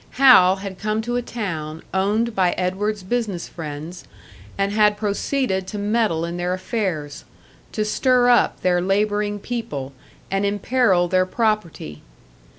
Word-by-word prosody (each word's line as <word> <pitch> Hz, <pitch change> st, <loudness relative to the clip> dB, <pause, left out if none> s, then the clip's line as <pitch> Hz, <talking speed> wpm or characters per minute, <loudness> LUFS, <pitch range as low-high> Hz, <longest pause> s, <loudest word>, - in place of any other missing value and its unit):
Hal 245 Hz, -9 st, +7 dB
had 195 Hz, -1 st, -8 dB
come 215 Hz, +1 st, -1 dB
to 240 Hz, +1 st, -3 dB
a 245 Hz, -, 0 dB
town 165 Hz, -10 st, -5 dB
owned 210 Hz, +5 st, +1 dB
by 185 Hz, -3 st, +2 dB
Edward's 195 Hz, +3 st, -2 dB
business 205 Hz, -4 st, -2 dB
friends, 160 Hz, +2 st, -7 dB, 0.5 s
and 195 Hz, 0 st, 0 dB
had 210 Hz, 0 st, +3 dB
proceeded 205 Hz, -1 st, -1 dB
to 210 Hz, -, -5 dB
meddle 205 Hz, -5 st, 0 dB
in 170 Hz, +1 st, -5 dB
their 180 Hz, +1 st, -1 dB
affairs, 185 Hz, -7 st, -3 dB, 0.5 s
to 215 Hz, -, -1 dB
stir 250 Hz, +3 st, +2 dB
up 245 Hz, -1 st, +3 dB
their 180 Hz, -1 st, +2 dB
labouring 205 Hz, +2 st, 0 dB
people 150 Hz, -, -5 dB, 0.4 s
and 195 Hz, +1 st, 0 dB
imperil 200 Hz, -2 st, +2 dB
their 185 Hz, +1 st, +2 dB
property. 215 Hz, -, -2 dB
200 Hz, 140 wpm, -21 LUFS, 180-215 Hz, 0.5 s, Hal